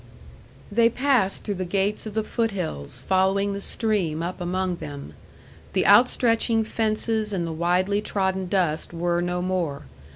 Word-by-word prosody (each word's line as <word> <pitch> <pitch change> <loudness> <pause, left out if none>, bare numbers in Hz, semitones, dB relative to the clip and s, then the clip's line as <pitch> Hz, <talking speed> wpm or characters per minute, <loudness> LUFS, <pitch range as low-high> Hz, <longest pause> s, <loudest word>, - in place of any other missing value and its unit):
They 230 +2 +4
passed 250 -6 +1
through 205 - -2
the - - +1
gates 200 +4 -1
of 215 - -8
the 220 - +1
foot 225 +1 -1
hills, 130 - -5
following 195 +1 +2
the 200 - -5
stream 190 -9 -1
up 180 +2 -4
among 180 0 -1
them. 145 - -8 0.6
The 185 - +2
outstretching 230 +1 +4
fences 220 0 -1
and 180 -4 -1
the 165 - -4
widely 180 +5 +1
trodden 190 -2 -1
dust 175 -4 0
were 175 +1 0
no 180 0 -1
more. 180 -6 -2
190 Hz, 155 wpm, -24 LUFS, 175-215 Hz, 0.6 s, They